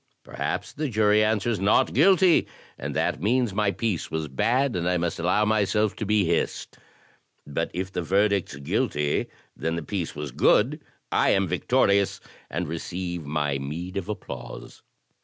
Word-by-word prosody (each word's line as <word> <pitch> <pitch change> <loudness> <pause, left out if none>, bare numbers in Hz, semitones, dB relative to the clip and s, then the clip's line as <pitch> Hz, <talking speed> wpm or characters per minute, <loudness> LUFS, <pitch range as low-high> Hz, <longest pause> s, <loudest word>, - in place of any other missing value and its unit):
Perhaps - - -4
the 150 0 -2
jury 105 -1 +3
answers, 110 0 0
'Not 100 +2 +3
guilty,* 180 +4 +5 0.3
and - - -5
that - - 0
means 120 +1 +1
my 105 0 +1
piece 100 -1 -2
was 80 -1 -3
bad, 120 - +1
and 90 0 0
I 90 - +2
must 85 -1 -2
allow 90 +5 +2
myself 105 0 +1
to 110 - -3
be 105 -2 +3
hissed; 85 0 -2 0.7
but 70 - -2
if 95 +2 -4
the 90 - -2
verdict's 100 -1 +1
'Guilty,' 70 +1 -1 0.3
then 80 0 -2
the 85 - -4
piece 85 +1 -4
was 75 -2 -5
good, 135 - +3 0.3
I - - +3
am - - +2
victorious, 100 0 +2 0.3
and 90 +2 -3
receive 85 0 -5
my 75 -2 -1
meed 85 +7 -5
of 100 0 -4
applause. 105 -4 -7
95 Hz, 160 wpm, -25 LUFS, 85-105 Hz, 0.7 s, guilty